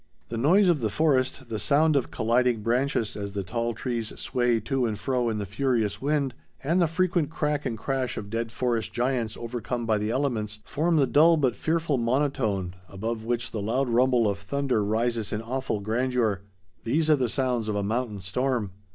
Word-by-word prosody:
The 115 Hz, -, -3 dB
noise 180 Hz, -, +4 dB
of 170 Hz, -4 st, +3 dB
the 110 Hz, -, +1 dB
forest, 130 Hz, 0 st, +1 dB
the 110 Hz, -2 st, -3 dB
sound 145 Hz, +9 st, +3 dB
of 135 Hz, -, +1 dB
colliding 120 Hz, -1 st, +1 dB
branches 120 Hz, -1 st, 0 dB
as 100 Hz, -1 st, -5 dB
the 100 Hz, -1 st, -2 dB
tall 115 Hz, +4 st, -2 dB
trees 115 Hz, -4 st, -3 dB
sway 120 Hz, -2 st, +1 dB
to 135 Hz, -3 st, 0 dB
and 110 Hz, -2 st, -3 dB
fro 125 Hz, +1 st, 0 dB
in 110 Hz, -, -2 dB
the 105 Hz, -, -3 dB
furious 110 Hz, -1 st, 0 dB
wind, 140 Hz, -2 st, 0 dB, 0.3 s
and 170 Hz, +6 st, +2 dB
the 170 Hz, -, +4 dB
frequent 170 Hz, -2 st, +1 dB
crack 150 Hz, -2 st, -1 dB
and 115 Hz, -, -3 dB
crash 130 Hz, 0 st, -2 dB
of 100 Hz, -1 st, -6 dB
dead 115 Hz, 0 st, -2 dB
forest 120 Hz, -1 st, -1 dB
giants 120 Hz, -2 st, -1 dB
overcome 120 Hz, 0 st, -4 dB
by 110 Hz, -2 st, +2 dB
the 105 Hz, +1 st, -1 dB
elements 115 Hz, -5 st, -1 dB
form 165 Hz, +3 st, 0 dB
the 145 Hz, -3 st, +4 dB
dull 160 Hz, +5 st, +5 dB
but 130 Hz, -6 st, +1 dB
fearful 160 Hz, -4 st, 0 dB
monotone, 115 Hz, -7 st, 0 dB, 0.2 s
above 110 Hz, +3 st, -4 dB
which 115 Hz, 0 st, -2 dB
the 110 Hz, -, -3 dB
loud 125 Hz, +5 st, 0 dB
rumble 120 Hz, -1 st, +3 dB
of 100 Hz, -1 st, -1 dB
thunder 130 Hz, +1 st, 0 dB
rises 115 Hz, +1 st, 0 dB
in 105 Hz, -, -1 dB
awful 130 Hz, -2 st, -2 dB
grandeur. 110 Hz, -1 st, 0 dB, 0.4 s
These 155 Hz, +7 st, +1 dB
are -, -, +7 dB
the 125 Hz, -4 st, 0 dB
sounds 125 Hz, -3 st, 0 dB
of 105 Hz, -, -1 dB
a 100 Hz, -, 0 dB
mountain 110 Hz, -1 st, -2 dB
storm. 115 Hz, +2 st, -1 dB
120 Hz, 195 wpm, -26 LUFS, 110-135 Hz, 0.4 s, are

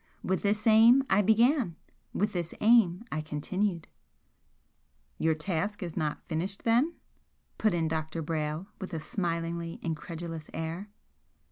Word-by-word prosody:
With 190 Hz, 0 st, 0 dB
this 210 Hz, +1 st, 0 dB
aim 230 Hz, +4 st, +7 dB
I 195 Hz, +2 st, +5 dB
began 225 Hz, -, +3 dB, 0.4 s
with 205 Hz, +2 st, 0 dB
this 175 Hz, -3 st, -3 dB
aim 215 Hz, -4 st, +4 dB
I 155 Hz, -, -1 dB
continued." 170 Hz, +4 st, -2 dB, 1.3 s
"Your 160 Hz, 0 st, +2 dB
task 185 Hz, +6 st, -2 dB
is 170 Hz, -3 st, -6 dB
not 155 Hz, -3 st, -2 dB
finished, 180 Hz, +5 st, -3 dB
then?" 245 Hz, +9 st, +3 dB, 0.6 s
put 215 Hz, -5 st, +2 dB
in 165 Hz, -1 st, +1 dB
Dr. 160 Hz, 0 st, -3 dB
Brayle, 155 Hz, +2 st, -2 dB
with 190 Hz, -3 st, -5 dB
a -, -, -2 dB
smilingly 170 Hz, 0 st, -3 dB
incredulous 165 Hz, 0 st, -5 dB
air. 165 Hz, +5 st, -4 dB
175 Hz, 130 wpm, -29 LUFS, 160-210 Hz, 1.3 s, aim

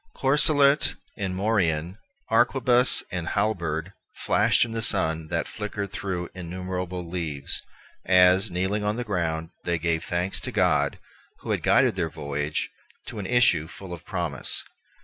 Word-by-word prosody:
Corselet 145 Hz, +1 st, +4 dB, 0.2 s
and 95 Hz, -3 st, -3 dB
morion, 95 Hz, -3 st, 0 dB, 0.3 s
arquebuse 125 Hz, -1 st, +4 dB
and 90 Hz, -2 st, -4 dB
halberd, 90 Hz, -5 st, -1 dB, 0.2 s
flashed -, -, +2 dB
in 115 Hz, -, -8 dB
the 115 Hz, 0 st, -3 dB
sun 80 Hz, -7 st, +1 dB
that -, -, -2 dB
flickered 105 Hz, -2 st, -5 dB
through 95 Hz, -4 st, -4 dB
innumerable 90 Hz, 0 st, -5 dB
leaves, 80 Hz, -5 st, -2 dB, 0.4 s
as, 90 Hz, +2 st, +5 dB
kneeling 95 Hz, +4 st, -1 dB
on 105 Hz, +1 st, 0 dB
the 125 Hz, -, -3 dB
ground, 85 Hz, -6 st, -2 dB
they 85 Hz, -1 st, 0 dB
gave 80 Hz, 0 st, -1 dB
thanks 90 Hz, +2 st, -1 dB
to -, -, -5 dB
God, -, -, +2 dB, 0.4 s
who -, -, -4 dB
had -, -, 0 dB
guided -, -, +3 dB
their 85 Hz, -4 st, -1 dB
voyage 75 Hz, -1 st, -3 dB, 0.3 s
to 110 Hz, -, -7 dB
an 95 Hz, -, -4 dB
issue 90 Hz, -11 st, +3 dB
full 90 Hz, +1 st, -10 dB
of 85 Hz, -, -9 dB
promise. -, -, -2 dB
90 Hz, 145 wpm, -25 LUFS, 85-105 Hz, 0.4 s, as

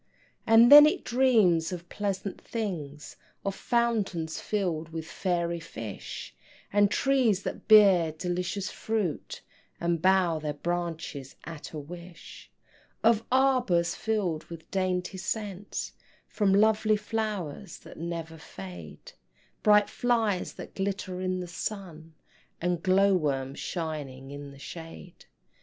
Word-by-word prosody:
And 230 Hz, +3 st, +7 dB
then 295 Hz, +1 st, +12 dB
it 305 Hz, -, -1 dB
dreams 220 Hz, -10 st, +3 dB
of 175 Hz, -1 st, -6 dB
pleasant 195 Hz, 0 st, -3 dB
things, 160 Hz, -10 st, -5 dB, 0.3 s
Of 195 Hz, -, 0 dB
fountains 205 Hz, -9 st, -1 dB
filled 175 Hz, -6 st, -2 dB
with 160 Hz, -1 st, -5 dB
fairy 170 Hz, -1 st, -1 dB
fish, 115 Hz, -, -7 dB, 0.4 s
And 205 Hz, 0 st, +5 dB
trees 245 Hz, -7 st, +2 dB
that -, -, -6 dB
bear 195 Hz, -7 st, +7 dB
delicious 180 Hz, +4 st, -3 dB
fruit, 215 Hz, -8 st, -3 dB, 0.4 s
And 170 Hz, -1 st, 0 dB
bow 185 Hz, -3 st, +3 dB
their 150 Hz, -1 st, -3 dB
branches 165 Hz, -4 st, -4 dB
at 160 Hz, -1 st, -8 dB
a 155 Hz, -, -6 dB
wish; 170 Hz, +3 st, -10 dB, 0.5 s
Of 225 Hz, -1 st, +4 dB
arbors 250 Hz, -11 st, +3 dB
filled 195 Hz, -8 st, -1 dB
with 165 Hz, -1 st, -11 dB
dainty 185 Hz, 0 st, -1 dB
scents 205 Hz, -1 st, -4 dB, 0.3 s
From 205 Hz, -3 st, +1 dB
lovely 215 Hz, +1 st, +4 dB
flowers 210 Hz, -5 st, -4 dB
that -, -, -13 dB
never 165 Hz, -1 st, -5 dB
fade; 90 Hz, -, -10 dB, 0.5 s
Bright 210 Hz, -1 st, +5 dB
flies 225 Hz, -6 st, 0 dB
that -, -, -10 dB
glitter 190 Hz, -2 st, -3 dB
in 185 Hz, 0 st, -1 dB
the 180 Hz, -, -6 dB
sun, 170 Hz, -4 st, -6 dB, 0.4 s
And 175 Hz, -1 st, -1 dB
glow 195 Hz, +2 st, +4 dB
worms 140 Hz, -5 st, -1 dB
shining 145 Hz, -6 st, -5 dB
in 145 Hz, 0 st, -8 dB
the 140 Hz, -, -13 dB
shade. 165 Hz, +5 st, -10 dB
180 Hz, 120 wpm, -28 LUFS, 160-210 Hz, 0.5 s, then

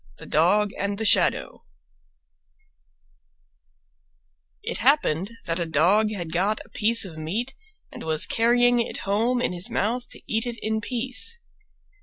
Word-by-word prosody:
THE -, -, -11 dB
DOG 200 Hz, +6 st, +2 dB
AND 200 Hz, 0 st, -2 dB
THE 220 Hz, -, -3 dB
SHADOW -, -, +3 dB, 3.0 s
It -, -, -3 dB
happened 230 Hz, -, +1 dB
that 165 Hz, +1 st, -1 dB
a 170 Hz, -, -1 dB
Dog 180 Hz, +8 st, +3 dB
had 175 Hz, -6 st, -5 dB
got 200 Hz, +5 st, +1 dB
a -, -, -21 dB
piece 225 Hz, 0 st, +3 dB
of 160 Hz, -4 st, -10 dB
meat 220 Hz, +12 st, -3 dB, 0.4 s
and -, -, -10 dB
was 160 Hz, -1 st, 0 dB
carrying 245 Hz, +1 st, +3 dB
it 235 Hz, -, -3 dB
home 230 Hz, +5 st, 0 dB
in 180 Hz, -, -1 dB
his 180 Hz, +6 st, -4 dB
mouth 235 Hz, +3 st, -2 dB
to -, -, -12 dB
eat 225 Hz, +2 st, -1 dB
it 235 Hz, -1 st, -5 dB
in 220 Hz, 0 st, -1 dB
peace. 255 Hz, -, 0 dB
215 Hz, 145 wpm, -24 LUFS, 180-240 Hz, 3.0 s, SHADOW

